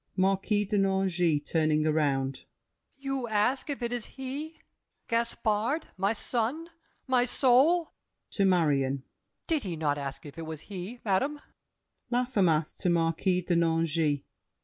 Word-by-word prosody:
MARQUIS 195 +2 +2
DE 205 - 0
NANGIS 190 -5 +2
(turning 155 -1 +2
around). 140 -4 0 0.5
You 270 -2 -3
ask 225 +6 +1
If 275 -3 -3
it 235 0 -1
is 240 -3 -4
he—Gaspard, 260 -3 -3
my 195 +2 +1
son, 245 +8 -2 0.4
my 255 -2 +3
soul? 275 +7 +3 0.4
[To 200 - +1
Marion.] 140 -8 +2 0.4
Did 320 -4 +1
he 185 -7 -4
not 145 -2 0
ask 140 +1 -6
if 145 +2 -10
it 165 - -6
was 160 -1 -6
he, 200 +4 -7
madame? 270 +10 +1 0.7
LAFFEMAS 200 - +2
(to 185 - 0
Marquis 170 +2 +1
de 175 0 0
Nangis). 165 -3 +1
195 Hz, 125 wpm, -29 LUFS, 160-245 Hz, 0.7 s, my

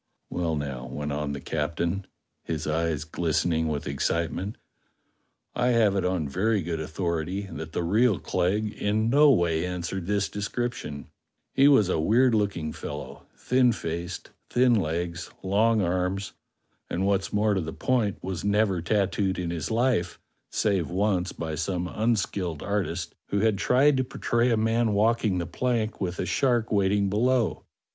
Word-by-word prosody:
"Well, 85 -2 -1
now," 70 -4 -4
went 75 +3 -4
on 75 0 -2
the 70 - -4
captain, 85 +6 -2 0.4
his 80 -2 -3
eyes 80 -1 0
glistening 80 +1 0
with 75 -1 -2
excitement, 85 +8 -2 1.0
"I 125 0 +1
have 115 -5 +3
it 95 - +1
on 90 -4 0
very 100 +7 +1
good 85 -1 -3
authority 85 +4 -2
that 80 +1 -7
the - - -1
real 105 +4 +3
Clegg 105 +4 0
in 110 +2 0
no 145 +2 +6
way 85 - +2
answered 90 0 -4
this 100 -1 +1
description: 105 - -4 0.5
he 135 - +5
was 135 -9 +5
a 90 - 0
weird 120 +9 +4
looking 100 -8 0
fellow; - - -7
thin 125 -1 +3
faced, 85 -2 -5 0.2
thin 125 0 +4
legs, 85 -3 -1
long 105 +3 +3
arms, 90 +2 -1 0.6
and, 95 +3 -1
what's 100 -1 +1
more 105 0 +2
to 95 - 0
the 80 -1 -4
point, 115 -3 0
was 95 -1 -4
never 100 -3 +2
tattooed 95 0 0
in 85 -2 -2
his 85 -2 -3
life 115 -6 +1 0.3
save 95 -7 0
once 95 -1 0
by 80 -1 -5
some 90 +3 -2
unskilled 100 -7 -1
artist 90 -4 -2
who 100 - 0
had 110 -3 +2
tried 135 +5 +4
to 130 - +2
portray 120 -1 0
a 115 - +2
man 110 0 +2
walking 110 -1 +2
the 85 - -1
plank 115 +5 -1
w^ith 90 -2 -2
a - - -1
shark 120 -4 +1
waiting 100 0 +2
below. 120 +3 +1
95 Hz, 155 wpm, -26 LUFS, 85-110 Hz, 1.0 s, no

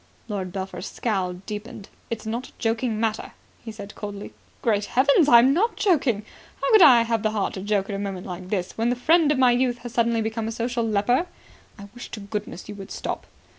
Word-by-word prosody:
Lord 195 -4 -4
Belpher's 190 +1 -5
scowl 190 -6 -2
deepened. 210 0 -7 0.2
"It's 225 -2 -5
not 235 +3 -3
a - - -18
joking 225 -1 -1
matter," 220 -1 -2 0.3
he 225 - -6
said 210 -1 -9
coldly. 205 -1 -7 0.3
"Great 210 -3 +1
Heavens, 280 - +4
I'm 240 +3 +7
not 430 +9 +1
joking. 270 - +1 0.3
How - - 0
could 435 -3 +7
I 245 -8 +8
have 230 -1 0
the 215 - +1
heart 215 -2 -1
to 190 - -6
joke 200 -1 0
at 200 - -4
a - - -4
moment 195 -2 -4
like 180 0 -7
this, 185 -3 -2
when 230 +1 +2
the 245 - +1
friend 310 +4 +3
of 295 - +1
my 255 -1 +5
youth 245 0 +1
has 240 - -6
suddenly 235 -2 +2
become 220 0 -3
a - - -3
social 235 +1 -2
leper?" 225 - +1 0.5
"I 200 -1 -10
wish 245 - -9
to 220 - -5
goodness 205 -2 -6
you 210 - -6
would 195 -2 -9
stop." - - -5
225 Hz, 215 wpm, -24 LUFS, 205-245 Hz, 0.5 s, I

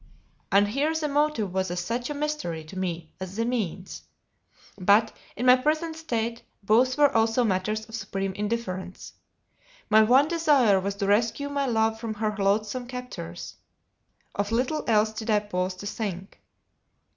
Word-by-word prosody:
And 205 +1 +4
here 290 +8 0
the 315 -1 0
motive 290 -9 0
was 190 -1 0
as 175 0 -3
much 240 +2 -2
a 295 - -3
mystery 285 - -3
to 155 +4 -12
me 175 -4 -4
as 190 0 -6
the 230 +1 0
means; 205 -7 -3 0.8
but, 205 +4 +3 0.2
in 245 - -3
my 250 0 +8
present 310 +5 -1
state, 235 -7 -3 0.2
both 245 +6 +3
were 290 -3 +4
also 225 +2 +3
matters 215 +1 -1
of 225 - -15
supreme 195 -3 -3
indifference. 190 -3 -4 0.8
My 215 +1 +7
one 255 +6 +5
desire 290 - +3
was 200 +1 -3
to 200 0 -2
rescue 225 +7 +1
my 280 -1 -1
love 220 -2 +1
from 225 -2 -4
her 215 0 -1
loathsome 210 +5 0
captors; 250 0 -7 0.8
of 205 +1 -2
little 255 +6 0
else 215 -1 +3
did 220 +1 -6
I 215 - +4
pause 185 -2 -2
to 185 - -9
think. 200 -3 -5
220 Hz, 160 wpm, -26 LUFS, 195-255 Hz, 0.8 s, my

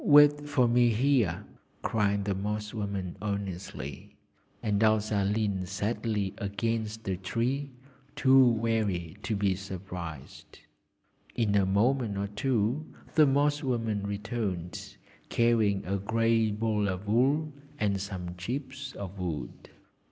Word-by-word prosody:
'Wait 145 0 +6
for 130 -4 +3
me 120 0 +4
here!' 110 - +2 0.4
cried 100 -2 +1
the 100 - +1
Moss 105 +2 -3
woman 100 -4 -3
earnestly, 100 -9 -5 0.5
and 105 -1 +1
Elsa 110 -2 +3
leaned 100 -3 0
sadly 105 0 -1
against 110 +2 -2
a 95 - 0
tree, 120 +9 -1 0.5
too 135 0 +6
weary 110 -8 +1
to 110 - -1
be 100 -1 +2
surprised. 90 -6 -8 0.8
In 110 -4 +1
a 100 -2 +3
moment 110 +2 +2
or 100 - -1
two 115 +5 0 0.3
the 155 -2 +6
Moss 145 +2 +2
woman 115 -7 -1
returned, 100 -4 -4 0.3
carrying 110 -4 +2
a 100 +2 0
grey 115 +2 +2
ball 105 -1 0
of 95 +2 -4
wool 140 +8 +2 0.2
and 100 -2 0
some 90 -3 -5
chips 130 +7 -5
of 100 -1 -7
wood. 80 -9 -5
105 Hz, 120 wpm, -29 LUFS, 100-120 Hz, 0.8 s, Wait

